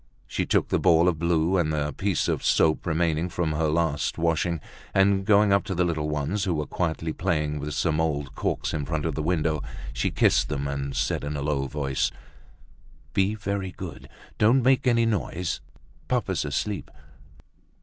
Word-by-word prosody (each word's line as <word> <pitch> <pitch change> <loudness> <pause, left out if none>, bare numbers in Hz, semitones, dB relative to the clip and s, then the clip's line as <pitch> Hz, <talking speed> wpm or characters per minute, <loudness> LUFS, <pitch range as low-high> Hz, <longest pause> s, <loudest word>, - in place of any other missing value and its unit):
She - - -2
took - - +2
the - - +2
ball 85 -1 +5
of 85 -4 +1
blue 85 +2 +2
and 80 -4 +1
the 75 -1 -1
piece 100 -3 0
of - - -1
soap 80 +2 +2
remaining 85 0 +1
from 85 -3 -1
her 80 +1 0
last 80 -1 0
washing, 85 0 +1 0.4
and 95 0 +3
going 105 -1 +5
up 100 - +3
to 95 -4 -3
the 90 - +2
little 80 -3 -1
ones 75 +7 -1
who 90 -3 0
were 75 -1 -1
quietly 80 -2 -2
playing 75 -2 -1
with 75 +1 -4
some 80 -2 +1
old 75 -4 -2
corks - - -2
in 75 - -1
front 75 0 -2
of 80 - -1
the 75 - -2
window, 80 -2 0 0.3
she - - 0
kissed - - +3
them, 70 +1 -2
and 70 -1 -3
said - - 0
in 75 +1 -3
a 70 - -3
low 70 -2 0
voice: 70 -1 -1 1.0
"Be 100 +2 +2
very 100 -3 -3
good, - - -8 0.3
don't 120 +4 +4
make 130 +1 +3
any 115 -2 +4
noise; 90 -5 -2 0.5
papa's - - 0
asleep." 85 +6 -2
80 Hz, 180 wpm, -26 LUFS, 75-95 Hz, 1.0 s, ball